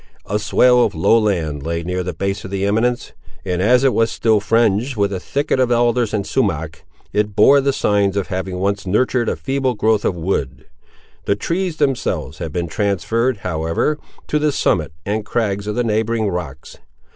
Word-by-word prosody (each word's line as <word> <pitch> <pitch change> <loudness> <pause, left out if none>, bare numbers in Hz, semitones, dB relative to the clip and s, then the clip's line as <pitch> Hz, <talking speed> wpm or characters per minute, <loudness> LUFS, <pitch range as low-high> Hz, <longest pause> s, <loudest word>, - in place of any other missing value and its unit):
A 105 +2 -1
swale 125 +4 +4
of - - -1
low - - +3
land 85 -9 -1
lay 85 +2 -3
near 90 +2 -2
the 90 0 -3
base 100 +5 -3
of - - -7
the 100 0 -2
eminence; 115 +4 0 0.3
and 90 -1 -1
as 125 +6 +4
it 135 -2 +3
was 115 0 +2
still 110 -2 +2
fringed 115 +3 +1
with 100 -1 +1
a 95 - -3
thicket 140 +6 -1
of 125 -1 +2
alders 120 -1 +2
and 100 -2 -2
sumack, 80 - -2 0.3
it 105 -1 0
bore 140 +6 +6
the 140 +1 +1
signs 100 -5 +1
of 100 - -2
having 95 0 -3
once 100 +1 -1
nurtured 120 +4 +1
a - - -1
feeble 135 -2 -1
growth 110 0 +1
of 90 - 0
wood. 80 -6 -3 0.6
The 100 - +2
trees 170 - -2
themselves 135 -4 -1
had 80 - -4
been 85 +2 -2
transferred, 105 +7 0
however, 85 - -1 0.3
to 150 - 0
the 150 0 +1
summit 80 - 0
and 105 +2 -1
crags 105 -2 -2
of 105 - -2
the 120 - +1
neighbouring 110 -1 0
rocks. 80 -7 -6
105 Hz, 190 wpm, -19 LUFS, 90-120 Hz, 0.6 s, bore